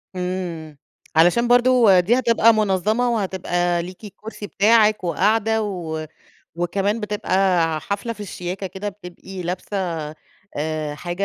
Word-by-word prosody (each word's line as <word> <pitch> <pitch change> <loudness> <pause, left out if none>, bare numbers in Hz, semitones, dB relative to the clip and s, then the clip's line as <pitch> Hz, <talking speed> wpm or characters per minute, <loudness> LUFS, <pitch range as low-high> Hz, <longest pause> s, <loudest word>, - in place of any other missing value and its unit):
إمم. 180 -4 -4 0.4
علشان 175 +9 +4
برضه 245 -5 +5
دي 220 +8 +2
هتبقى 230 -2 +4
منظَّمة 215 +3 +1
وهتبقى 175 -5 -1
ليكِ 185 +4 -11
الكرسي 210 +1 -9
بتاعِك 215 0 +3
وقاعدة 220 +6 +1
و 170 -6 -4 0.5
وكمان 195 +6 -1
بتبقى 195 -4 +1
ع 155 - -2
حفلة 200 +8 -4
في 215 - -14
الشياكة 185 -1 -5
كده 190 +2 -5
بتبقي 190 -1 -9
لابسة 180 +3 -4 0.8
آآ 155 0 -3
حاجة 175 +5 -3
195 Hz, 125 wpm, -21 LUFS, 175-215 Hz, 0.8 s, برضه